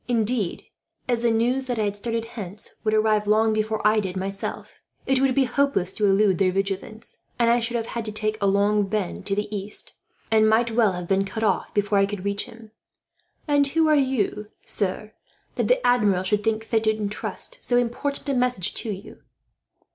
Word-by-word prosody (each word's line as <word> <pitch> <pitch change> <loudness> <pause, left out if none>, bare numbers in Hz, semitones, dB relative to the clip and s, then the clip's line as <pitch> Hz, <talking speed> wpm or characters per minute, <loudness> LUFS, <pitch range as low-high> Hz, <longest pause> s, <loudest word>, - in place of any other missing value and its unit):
Indeed, 230 -5 0 0.4
as 240 -2 +1
the 235 0 +2
news 240 +4 +1
that 245 -2 -3
I 215 - +1
had 205 -1 -1
started 230 +2 -3
hence 210 -4 -7
would 215 -1 +1
arrive, 215 -1 +2
long 220 +1 +3
before 215 0 -1
I 215 +1 +5
did 190 -2 -3
myself, 195 +1 -5 0.3
it 265 0 +2
would 270 -2 +2
be 275 - +4
hopeless 260 -8 +1
to 210 - +1
elude 195 -2 +3
their 190 -2 +3
vigilance; 195 +3 -4 0.2
and 235 -1 +3
I 240 - +4
should 235 +1 -2
have 225 - -3
had 230 -1 -5
to 215 0 -4
make 215 0 -1
a 200 - +2
long 200 +1 +2
bend 195 -3 -3
to 195 - +1
the 210 +1 -3
east, 200 +1 -2 0.4
and 220 -1 +5
might 230 +2 +2
well 220 -4 +3
have 180 -1 -5
been 195 +1 +2
cut 220 +3 -5
off 215 - 0
before 205 0 +2
I 195 - +3
could 200 -2 -6
reach 200 0 -1
him. 225 -2 -14 0.8
"And 285 -1 +4
who 320 +3 +2
are 305 - +5 0.2
you, 210 -1 -1 0.2
sir, 210 +2 -1 0.4
that - - -1
the - - +2
Admiral 210 -7 +3
should 205 +2 0
think 220 -1 0
fit 225 0 0
to - - +4
intrust 215 - -4
so 245 - +1
important 250 +5 -1
a 280 - +1
message 245 -8 +1
to 225 - -3
you?" 195 +1 -9
215 Hz, 205 wpm, -24 LUFS, 200-235 Hz, 0.8 s, I